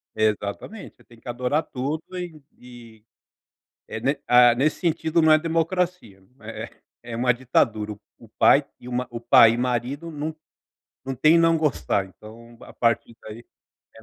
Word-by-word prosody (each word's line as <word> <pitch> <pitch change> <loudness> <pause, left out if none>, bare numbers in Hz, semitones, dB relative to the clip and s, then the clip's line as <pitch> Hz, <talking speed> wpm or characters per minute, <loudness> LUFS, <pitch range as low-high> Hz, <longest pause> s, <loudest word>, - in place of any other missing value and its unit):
Exatamente, 110 - -3
você - - -22
tem 115 -1 -19
que 120 - -11
adorar 125 +6 -1
tudo 145 +4 -4
e 175 -4 -7 0.2
e 120 -3 -15 0.9
é, 110 - -6
né. 135 +5 0
Ah, 120 -1 +6
nesse 140 +6 0
sentido, 165 -1 0
não 160 0 +5
é 155 - +6
democracia, 165 - -2 0.2
é - - -8
é - - -15 0.3
é - - -4
uma 125 +1 +2
ditadura, 115 -4 0
o 105 - -12 0.2
o 115 - -17
pai 140 +6 +4 0.2
e 125 - -11
o - - -7
ma 125 +1 -2
o 115 -1 -7
pai 115 -1 +6
e - - -2
o 120 - -3
marido 125 +6 -2
não 155 +1 -5 0.7
não 135 0 -4
tem 155 +6 +4
não 165 0 +4
gostar. 100 - 0
Então, 115 +4 -15
a - - -13
partir 115 0 0
daí 110 +2 -10 0.5
é 110 - -15
125 Hz, 180 wpm, -23 LUFS, 115-155 Hz, 0.9 s, Ah